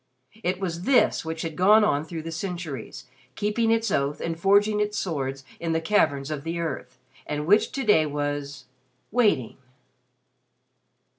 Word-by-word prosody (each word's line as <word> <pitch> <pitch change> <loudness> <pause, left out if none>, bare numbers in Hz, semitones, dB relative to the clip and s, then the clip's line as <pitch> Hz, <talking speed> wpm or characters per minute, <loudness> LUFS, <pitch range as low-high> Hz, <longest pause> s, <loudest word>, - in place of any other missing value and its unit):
It 180 -1 -1
was 175 -3 -3
this 255 -5 +3
which 160 0 -4
had 165 -2 -4
gone 210 +6 +6
on 145 -8 +2
through 165 -1 -6
centuries, 165 - -6 0.3
keeping 210 +2 0
its 225 -2 +1
oath 140 +2 0
and 165 -1 -4
forging 205 +3 +3
its 210 0 -1
swords 135 -6 -3
in 165 -1 -1
the 165 - +1
caverns 155 -6 +1
of 145 -2 -4
the 165 +1 -3
earth, 160 -6 -5 0.3
and 150 0 -3
which 205 +6 +4
to 270 - -2
day 160 -9 +4
was 145 -1 -4 0.5
waiting. 205 - +2
165 Hz, 150 wpm, -25 LUFS, 145-205 Hz, 0.5 s, gone